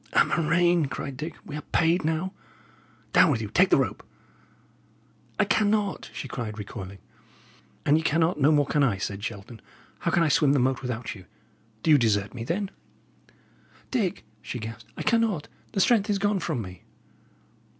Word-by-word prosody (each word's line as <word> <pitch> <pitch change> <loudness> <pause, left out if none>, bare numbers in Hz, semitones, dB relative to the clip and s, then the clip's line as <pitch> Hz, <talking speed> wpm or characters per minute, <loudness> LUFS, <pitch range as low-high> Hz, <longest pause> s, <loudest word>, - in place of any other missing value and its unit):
"A - - +5
murrain!" 170 0 +2
cried 135 0 -5
Dick. 155 +4 -6
"We 150 - -7
are 150 - -4
paid 165 +3 +1
now! 160 +5 -1 0.8
Down - - +6
with - - +1
you - - -4
take - - +4
the - - +5
rope." - - -1 1.4
"I 215 - +4
cannot," 205 -1 +1
she - - -6
cried, 115 -4 -5
recoiling. 100 -2 -7 0.9
"An 145 - +5
ye - - 0
cannot, 160 +1 +1
no 145 +3 +5
more 145 -2 +4
can 145 +2 +1
I," 120 -8 +2
said 100 +1 -4
Shelton. 110 0 -7 0.4
"How - - -1
can 170 - +3
I - - +3
swim 145 -1 +4
the 145 - +3
moat 130 +1 +1
without 125 -2 -4
you? 95 -4 -13 0.6
Do 160 - +3
you 150 - +7
desert 105 -3 +1
me, 120 -2 -5
then?" 190 - -2 1.2
"Dick," 215 -9 -1 0.2
she 125 - -5
gasped, 110 0 -8
"I - - -3
cannot. 225 -9 +1 0.3
The - - 0
strength 215 +1 +3
is 205 - +2
gone 205 0 +1
from 125 -7 -2
me." 90 -2 -10
150 Hz, 175 wpm, -26 LUFS, 115-180 Hz, 1.4 s, you